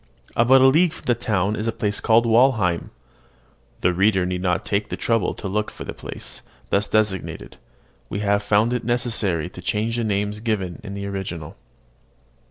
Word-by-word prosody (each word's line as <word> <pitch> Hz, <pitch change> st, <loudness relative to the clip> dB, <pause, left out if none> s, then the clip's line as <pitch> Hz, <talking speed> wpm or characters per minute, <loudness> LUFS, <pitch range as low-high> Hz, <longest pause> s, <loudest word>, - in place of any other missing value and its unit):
About 130 Hz, +3 st, +5 dB
a -, -, +7 dB
league 160 Hz, +5 st, +4 dB
from -, -, -13 dB
the 120 Hz, -, +3 dB
town 105 Hz, -3 st, 0 dB
is 110 Hz, +1 st, -3 dB
a -, -, +2 dB
place 105 Hz, -2 st, -1 dB
called 115 Hz, +1 st, +4 dB
Walheim. 115 Hz, -7 st, +3 dB, 0.9 s
(The 90 Hz, -, +3 dB
reader 95 Hz, 0 st, +3 dB
need 90 Hz, 0 st, -2 dB
not 90 Hz, -2 st, 0 dB
take 105 Hz, +1 st, -1 dB
the -, -, -4 dB
trouble 115 Hz, -5 st, 0 dB
to -, -, -6 dB
look 105 Hz, +2 st, -1 dB
for -, -, -8 dB
the -, -, -6 dB
place -, -, -7 dB, 0.3 s
thus 100 Hz, +1 st, +2 dB
designated. 95 Hz, -, -1 dB, 0.5 s
We 100 Hz, -, -3 dB
have 100 Hz, 0 st, +2 dB
found 105 Hz, +3 st, +2 dB
it 125 Hz, -, -2 dB
necessary 115 Hz, -8 st, 0 dB
to -, -, -10 dB
change 115 Hz, +3 st, -1 dB
the 120 Hz, -, 0 dB
names 105 Hz, 0 st, -1 dB
given 105 Hz, -6 st, -2 dB
in 100 Hz, -2 st, -7 dB
the 100 Hz, 0 st, -5 dB
original.) 95 Hz, -6 st, -5 dB
105 Hz, 180 wpm, -22 LUFS, 95-115 Hz, 0.9 s, a